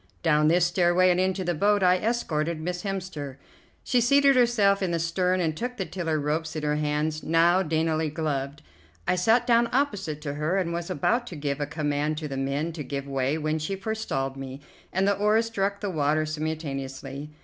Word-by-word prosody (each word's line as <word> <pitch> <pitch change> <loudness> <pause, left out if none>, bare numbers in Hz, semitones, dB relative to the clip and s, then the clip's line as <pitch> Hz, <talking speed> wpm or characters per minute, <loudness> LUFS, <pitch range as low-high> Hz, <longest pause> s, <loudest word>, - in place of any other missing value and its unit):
Down 150 -2 +3
this 175 +2 +4
stairway 175 +1 +3
and 180 - +1
into 185 0 0
the 175 0 0
boat 205 +4 +2
I 180 0 +5
escorted 170 -9 -1
Miss 180 +2 -3
Hemster. 180 -9 -5 0.5
She 245 - +2
seated 280 +3 +5
herself 220 -5 +3
in 190 - 0
the 170 - 0
stern 180 +3 0
and 160 -3 0
took 250 +8 -4
the 190 - -2
tiller 165 -2 -2
ropes 155 +2 -2
in 155 - -3
her 150 0 +1
hands, 150 +1 -1
now 170 +3 +3
daintily 160 -2 0
gloved. 145 -2 -3 0.4
I - - +3
sat 225 +7 +3
down 235 -1 +3
opposite 205 - -1
to 145 -2 -4
her 155 +6 -1
and 175 -3 -1
was 170 0 -4
about 240 - 0
to 180 - -7
give 145 -1 -3
a 145 - -1
command 150 0 -1
to 155 -1 -4
the 135 - -5
men 140 +5 -2
to 155 -2 -5
give 140 -1 -4
way 135 +2 0
when 155 0 -1
she 175 +6 -3
forestalled 195 -11 -3
me, 135 +1 -7 0.3
and 190 +2 +1
the 200 - +4
oars 210 +3 +2
struck 200 -3 -2
the 205 -2 -2
water 155 -1 +1
simultaneously. 145 -3 -5
165 Hz, 200 wpm, -26 LUFS, 150-195 Hz, 0.5 s, I